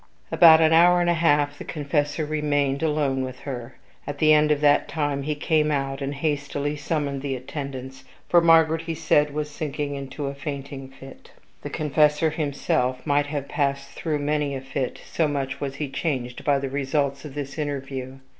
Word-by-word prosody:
About 165 -2 +8
an 160 0 +4
hour 175 +2 +6
and 175 0 +2
a - - +3
half 145 -3 +2
the - - -6
confessor 145 0 -1
remained 145 -2 0
alone 150 -4 0
with 130 -1 -7
her. 125 -3 -7 0.3
At 145 0 -4
the 155 +1 +5
end 150 0 +4
of 150 -1 +2
that 145 -1 +4
time 145 -3 -1
he 150 +2 -2
came 150 +1 +1
out, 135 -1 -2
and 140 +1 -3
hastily 145 0 -2
summoned 145 -2 -2
the 135 -1 -2
attendants, 130 0 -7 0.2
for 175 - +5
Margaret, 165 -1 +5
he 165 0 -4
said, 150 -2 +2
was 150 0 -3
sinking 145 -1 -4
into 140 +1 -5
a 140 - -3
fainting 140 -1 -6
fit. 135 0 -14 0.3
The - - -6
confessor 150 +1 +2
himself 140 -4 -1
might 145 -1 +2
have 145 -2 -4
passed 140 -1 -1
through 155 -3 -2
many 145 -1 -1
a 135 - -5
fit, 135 -1 -3
so 160 - 0
much 140 -2 -3
was 135 -1 -3
he 150 +1 -3
changed 130 -4 -3
by 145 -1 +3
the 135 0 -3
results 140 0 -1
of 150 -3 -9
this 145 +1 -5
interview. 135 -3 -4
145 Hz, 185 wpm, -24 LUFS, 135-150 Hz, 0.3 s, About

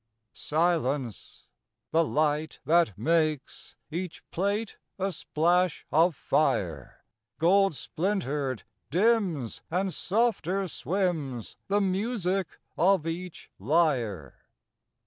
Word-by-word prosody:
Silence. 150 - -1 0.5
The 165 +1 +4
light, 155 0 0
that 165 - +3
makes 155 +3 0 0.2
Each 175 +1 -5
plate 200 +4 -1 0.2
a 195 0 -1
splash 175 +1 +1
of 165 +1 +4
fire, - - -1 0.3
Gold 195 +1 +4
splintered, 150 - -2 0.3
dims; 180 - +1
and 185 +2 0
softer 195 -3 0
swims 160 - -2
The 205 +1 +2
music 195 -2 -1 0.2
of 185 -2 +4
each 170 +1 -6
lyre. 120 - 0
170 Hz, 90 wpm, -28 LUFS, 150-190 Hz, 0.5 s, The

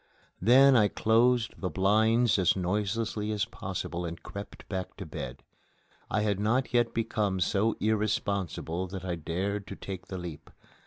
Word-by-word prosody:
Then 130 +6 +7
I 105 -4 +6
closed 115 +2 +2
the 90 - -1
blinds 110 +6 +3
as 90 -2 +3
noiselessly 105 +3 -1
as 105 -2 0
possible 85 +1 -5
and 85 -1 -6
crept 100 +1 -9
back 95 -2 -5
to - - -6
bed: - - -7 0.7
I 110 - +1
had 105 -2 0
not 120 +6 +1
yet 120 -1 +3
become 105 -4 -1
so 105 +4 +1
irresponsible 100 -5 -1
that 95 0 -7
I 90 - -1
dared 95 +5 -3
to - - -6
take 95 -2 -7
the 95 - -5
leap. 85 -4 -8
100 Hz, 155 wpm, -29 LUFS, 95-110 Hz, 0.7 s, Then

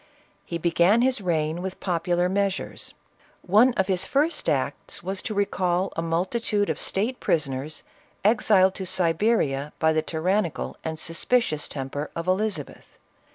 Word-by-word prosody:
He 170 - -3
began 175 +7 +3
his 255 -4 +1
reign 165 -2 -1
with 190 0 -5
popular 175 0 0
measures. 195 0 -2 0.5
One 215 +8 +5
of 190 - +2
his 185 -1 +1
first 295 - 0
acts - - -2
was 190 +1 -2
to 215 - -4
recall 185 -2 0
a - - -1
multitude 200 +5 0
of - - -4
state 225 +6 -1
prison 145 -5 +1
ers, 140 +4 -5 0.4
exiled 205 -3 +4
to 190 - -5
Siberia 165 -6 +1
by 160 0 +3
the 155 - +2
tyrannical 175 +3 -1
and 160 0 -4
suspicious 165 0 +1
temper 145 +2 -5
of 165 - -4
Elizabeth. 205 +3 -2
180 Hz, 145 wpm, -25 LUFS, 165-205 Hz, 0.5 s, One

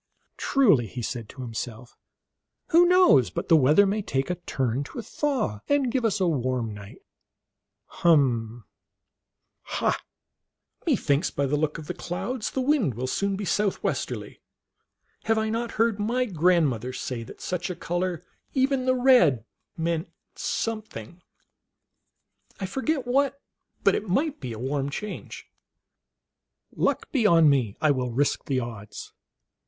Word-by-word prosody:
" - - -55
Truly," 195 - +3
he 120 +4 -6
said 115 -1 -4
to 130 -1 -8
himself, 115 0 -6 0.4
" - - -57
who 345 +2 +6
knows 360 - +5
but 85 - -5
the 165 - +7
weather 150 +7 +5
may 205 +2 0
take 135 -4 -1
a - - -1
turn 130 0 0
to - - -11
a 235 - -4
thaw, 230 - -1
and 280 -4 +2
give 255 -1 0
us 215 -2 +1
a 185 - +2
warm 130 -7 -1
night? 100 -1 -12 0.8
Hum! 120 - +1 1.0
ha! - - -1 0.9
methinks 145 +4 +2
by 140 - -1
the 140 +2 0
look 150 +1 -1
of 160 - -8
the 180 - -4
clouds 205 +7 -4
the 265 - -2
wind 255 - +1
will 125 +3 -3
soon 200 +9 -1
be 200 +1 -4
southwesterly. 205 +1 -2 0.8
Have 225 0 +2
I 220 0 0
not 230 +1 -2
heard 225 -2 +1
my 240 +5 0
grandmother 160 - +1
say 125 -2 -4
that 115 - -11
such 180 0 -3
a 180 - -3
color, 175 0 -2 0.3
even 265 -1 +2
the 255 - +4
red, 215 - +4 0.3
meant 165 +1 -1 0.2
something? 205 - -4 1.4
I 195 - -2
forget 265 +7 -1
what, 275 +2 +1 0.4
but - - +5
it 215 - -2
might 285 - 0
be 125 -4 -5
a 110 - -6
warm 135 +3 -2
change. 210 +8 -7 1.3
Luck - - 0
be 250 -6 +1
011 165 -5 +6
me, 125 -8 0
I 155 - +3
will 130 -2 -1
risk 140 +5 0
the 135 -2 0
odds." 110 -4 -8
170 Hz, 150 wpm, -26 LUFS, -, 1.4 s, the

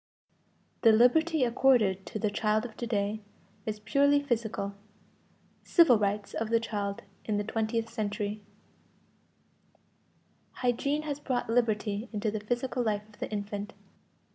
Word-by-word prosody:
=The 225 - +7
liberty 305 +7 +4
accorded 235 -6 +3
to 220 - -4
the 215 -1 0
child 215 +2 +1
of 225 -3 -8
to 240 - -4
day 210 0 -1 0.5
is 215 -1 -3
purely 285 +6 +3
physical. 220 -6 -2 0.9
Civil 315 - +5
rights 205 0 -1
of 225 0 -2
the 230 0 +3
child 205 -3 -3 0.2
in 210 -2 0
the 205 - 0
twentieth 225 +1 -1
century=. 210 -2 -3 2.1
Hygiene 280 +5 0
has 290 -2 -3
brought 255 -5 -2
liberty 220 -2 0
into 215 -1 -1
the 215 - -3
physical 245 +4 -2
life 210 -2 -1
of 210 - -20
the - - -4
infant. 205 0 -4
220 Hz, 135 wpm, -29 LUFS, 210-245 Hz, 2.1 s, =The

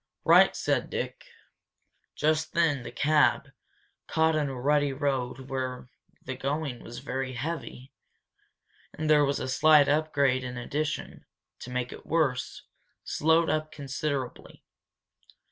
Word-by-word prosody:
"Right!" - - +6
said - - 0
Dick. - - -4 0.9
Just 155 +1 0
then 160 -6 +2
the 120 - -8
cab, 150 -2 +2 0.6
caught 160 0 +2
in 150 -2 0
a 130 -2 -6
rutty 145 +1 +2
road 135 -2 -2
where 130 -2 -4 0.4
the 130 - -4
going 140 -1 -3
was 120 - -9
very 130 -1 -3
heavy, 130 -1 -6 1.0
and 155 - -3
there 150 -1 +5
was 140 0 0
a 130 - -3
slight 150 +2 +5
upgrade 140 -3 +2
in 125 -1 -6
addition, 145 +5 -4 0.3
to - - -9
make 125 -1 -3
it - - -10
worse, 145 -6 0 0.4
slowed 160 +1 +2
up 155 0 -2
considerably. 140 -2 -5
140 Hz, 130 wpm, -28 LUFS, 130-155 Hz, 1.0 s, Right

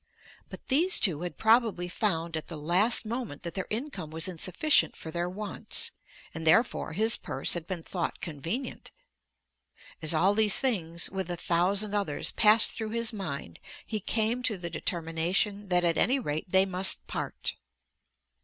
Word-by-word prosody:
But - - -12
these 335 +8 +4
two 170 -7 +3
had 180 0 -6
probably 220 -5 +2
found 170 -4 -1
at 160 - -5
the 165 - -7
last 185 +11 +2
moment 230 - -5
that 170 - -5
their 190 - -4
income 235 - -4
was 160 +2 -1
insufficient 185 - +1
for 160 - -8
their 175 +2 -2
wants, 205 +3 -4 0.4
and 160 -1 -5
therefore 225 -2 +2
his 220 +5 +3
purse - - 0
had 170 -1 -4
been 180 -4 -5
thought 175 0 -4
convenient. 175 - -5 1.1
As 155 - +3
all 185 +6 +3
these 210 -1 +5
things, 170 -11 0
with 190 -2 -4
a 175 - -3
thousand 195 +5 +1
others, 200 -8 -1
passed 215 +1 +5
through 220 -1 -5
his 230 +1 -1
mind 140 - -6 0.3
he 215 - -3
came 220 +4 0
to 225 -5 -1
the 170 -2 -6
determination 175 +5 -1
that 180 -1 +2
at 170 -1 +2
any 260 +4 +4
rate 155 - -4
they 190 +1 +4
must 190 0 +1
part. - - -4
190 Hz, 165 wpm, -28 LUFS, 165-220 Hz, 1.1 s, these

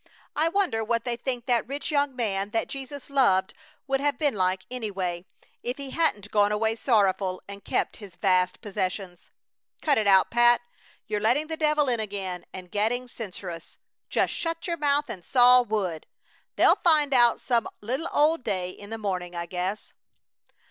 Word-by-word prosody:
I 320 +2 +2
wonder 350 - 0
what 230 +1 0
they 240 -1 -2
think 245 0 -3
that 240 -3 +1
rich 285 +4 -4
young 285 -2 +1
man 200 -5 -1
that 225 - 0
Jesus 275 +1 -8
loved 195 -8 +3 0.3
would 270 -1 0
have 285 +1 0
been 290 -3 +1
like, 185 -2 0
anyway, 190 -7 -3 0.4
if 245 +2 -4
he 275 -2 -7
hadn't 210 -12 0
gone 205 -1 +3
away 220 +1 +1
sorrowful 200 -6 +1
and 200 0 -10
kept - - -1
his 200 -5 -12
vast 185 -2 +1
possessions. 190 -3 -4 0.5
Cut 290 -6 +2
it 215 - 0
out, 190 -1 +5
Pat! 240 0 +5 0.4
You're 210 -1 -2
letting 245 +8 +2
the 320 +1 -4
devil 300 -2 +2
in 240 -2 +1
again 195 -4 -5
and 180 -1 -10
getting 235 +5 0
censorious! 185 -7 -8 0.3
Just - - +1
shut 330 -1 -3
your 340 -2 -2
mouth 290 -1 +2
and 180 - -7
saw 250 +2 +6
wood! 200 -9 -2 0.5
They'll - - +5
find 300 -4 +3
out 240 -2 +5
some 235 -3 0
little 260 +10 -3
old 300 -1 +3
day 185 -4 -2
in 205 +2 -12
the 225 - -4
morning, 180 -4 -3
I 170 0 -3
guess." 180 +4 -4
225 Hz, 175 wpm, -26 LUFS, 195-270 Hz, 0.5 s, saw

